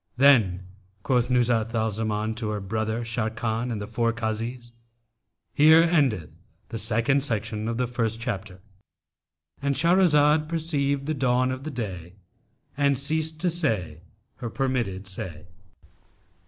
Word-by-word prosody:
Then 115 Hz, -10 st, +5 dB, 0.4 s
quoth 125 Hz, -1 st, +1 dB
Nuzhat 120 Hz, -2 st, +1 dB
al 110 Hz, 0 st, +1 dB
Zaman 110 Hz, 0 st, -2 dB
to 110 Hz, -1 st, -4 dB
her 105 Hz, -1 st, -2 dB
brother 110 Hz, +3 st, -2 dB
Sharrkan 115 Hz, +1 st, -2 dB
and 110 Hz, -, -3 dB
the 105 Hz, -, -4 dB
four 115 Hz, +2 st, 0 dB
Kazis, 115 Hz, +2 st, -4 dB, 0.8 s
"Here 160 Hz, +3 st, +7 dB
endeth 135 Hz, -, +1 dB, 0.4 s
the 115 Hz, -, -4 dB
second 115 Hz, +6 st, +1 dB
section 110 Hz, -4 st, -2 dB
of 115 Hz, 0 st, -2 dB
the 125 Hz, -, +1 dB
first 115 Hz, -2 st, -2 dB
chapter."—And 105 Hz, +5 st, -7 dB
Shahrazad 155 Hz, -4 st, +4 dB
perceived 140 Hz, -4 st, -1 dB
the 155 Hz, -, -1 dB
dawn 130 Hz, -2 st, +1 dB
of 135 Hz, +4 st, -5 dB
day 95 Hz, -6 st, -5 dB, 0.6 s
and 140 Hz, -1 st, +2 dB
ceased 155 Hz, +3 st, -1 dB
to 180 Hz, -, +2 dB
say 105 Hz, -, -1 dB, 0.4 s
her 120 Hz, -3 st, -5 dB
permitted 120 Hz, -7 st, -2 dB
say. 90 Hz, -4 st, -7 dB
115 Hz, 125 wpm, -25 LUFS, 110-140 Hz, 0.8 s, Here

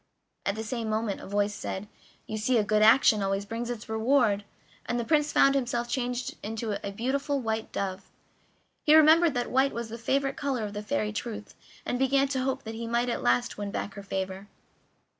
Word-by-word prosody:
At 200 Hz, -, +1 dB
the 220 Hz, -, -4 dB
same 225 Hz, 0 st, -3 dB
moment 215 Hz, -2 st, -1 dB
a -, -, -9 dB
voice 205 Hz, +1 st, 0 dB
said: 195 Hz, 0 st, -5 dB, 0.4 s
"You 215 Hz, -, -4 dB
see 240 Hz, +3 st, +2 dB
a 215 Hz, -, +3 dB
good 210 Hz, +1 st, +2 dB
action 220 Hz, -1 st, +6 dB
always 195 Hz, +1 st, -1 dB
brings 230 Hz, +3 st, -4 dB
its 235 Hz, -3 st, -5 dB
reward," 220 Hz, -2 st, +2 dB, 0.4 s
and 240 Hz, -, -1 dB
the 235 Hz, -, -2 dB
Prince 300 Hz, 0 st, +2 dB
found 275 Hz, -, +5 dB
himself 245 Hz, -3 st, -1 dB
changed 245 Hz, 0 st, -2 dB
into 220 Hz, +1 st, -4 dB
a 200 Hz, -, -3 dB
beautiful 275 Hz, +6 st, -1 dB
white 220 Hz, -2 st, -3 dB
dove. 195 Hz, -1 st, -4 dB, 0.7 s
He 305 Hz, -, +6 dB
remembered 315 Hz, 0 st, +6 dB
that 245 Hz, 0 st, -2 dB
white 265 Hz, +2 st, +3 dB
was 235 Hz, -1 st, -4 dB
the 230 Hz, +1 st, -7 dB
favorite 275 Hz, +3 st, 0 dB
color 270 Hz, -5 st, -1 dB
of 205 Hz, -1 st, -4 dB
the 205 Hz, -, -4 dB
Fairy 210 Hz, -2 st, -1 dB
Truth, 215 Hz, -1 st, -6 dB, 0.3 s
and 245 Hz, -, -2 dB
began 270 Hz, +1 st, +3 dB
to 265 Hz, -2 st, -1 dB
hope 265 Hz, 0 st, -2 dB
that 225 Hz, -, -6 dB
he 230 Hz, +1 st, -5 dB
might 235 Hz, +1 st, +1 dB
at -, -, -2 dB
last 125 Hz, +9 st, +1 dB
win 205 Hz, -1 st, -3 dB
back 200 Hz, 0 st, -4 dB
her 200 Hz, -, -8 dB
favor. 190 Hz, 0 st, -4 dB
230 Hz, 205 wpm, -28 LUFS, 210-260 Hz, 0.7 s, action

